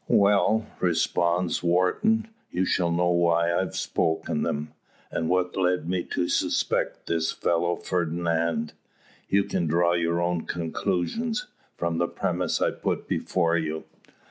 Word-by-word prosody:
"Well," 105 +2 +4
responds 85 0 +1
Wharton, 95 - +2 0.2
"you 90 +2 0
shall 90 -1 +1
know 90 +1 +2
why 85 -1 +3
I've 95 +2 -1
spoken 80 0 -1
them, 75 +1 -2 0.4
and 80 - -1
what's 90 0 +1
led 90 -3 +1
me 90 0 0
to 90 - -1
suspect 90 - 0
this 80 -1 0
fellow 85 +1 0
Fernand. 85 -2 -1 0.6
You 100 0 +3
can 85 - -1
draw 85 +2 +3
your 85 0 +1
own 85 -1 -1
conclusions, 95 - -2 0.3
from 85 -1 -1
the 85 - +2
premises - - -1
I - - +2
put - - -3
before 85 -2 +1
you. 80 -1 -3
85 Hz, 135 wpm, -26 LUFS, 85-90 Hz, 0.6 s, Well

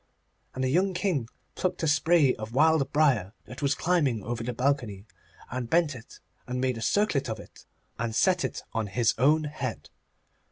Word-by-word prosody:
And 130 - -2
the 130 - +1
young 185 +6 +1
King 170 - -1 0.2
plucked 185 -2 -2
a - - +2
spray 145 -2 +4
of 110 +2 -8
wild 155 -2 +3
briar 130 -11 +2
that 125 - -10
was 140 -1 +1
climbing 145 - +1
over 120 0 -4
the 125 - -2
balcony, 120 -6 -1 0.5
and 125 -1 -4
bent 165 -1 +2
it, 120 -2 -12 0.3
and 125 0 -3
made 130 -2 0
a - - -8
circlet 145 - +1
of 110 - -4
it, - - -15 0.3
and 115 -1 -2
set 185 +3 +3
it - - -4
on 110 -2 -1
his 115 +3 +1
own 150 +5 +4
head. 135 - -5
130 Hz, 185 wpm, -27 LUFS, 115-155 Hz, 0.5 s, spray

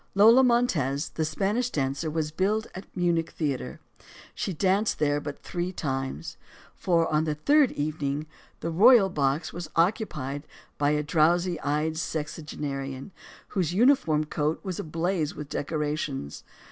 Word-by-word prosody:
Lola 225 +6 +7
Montez, 170 - +1
the 160 - -2
Spanish 200 +10 0
dancer, 140 - -2
was 155 -1 -2
billed 205 +6 0
at 190 - -8
a - - -33
Munich 170 -2 +1
theater. 145 -5 -3 0.5
She - - -3
danced 195 +5 +1
there 145 -1 +1
but 145 -1 -7
three 175 +1 -3
times. 135 - -4 0.4
For, 170 -2 +1
on 155 +1 +2
the 155 -1 -1
third 285 - +4
evening, 145 0 -2 0.4
the 165 - -2
royal 205 +3 +6
box 145 -1 -1
was 175 -1 -6
occupied 160 - 0 0.3
by 145 0 +3
a 150 0 +1
drowsy 170 +3 +2
eyed 150 +3 -1
sexagenarian 150 -2 -4 0.4
whose 180 -3 -1
uniform 225 - +4
coat 150 +1 -1
was 185 -3 -4
ablaze 165 0 -1
with 150 -1 -7
decorations. 145 - -3
160 Hz, 140 wpm, -27 LUFS, 145-185 Hz, 0.5 s, Lola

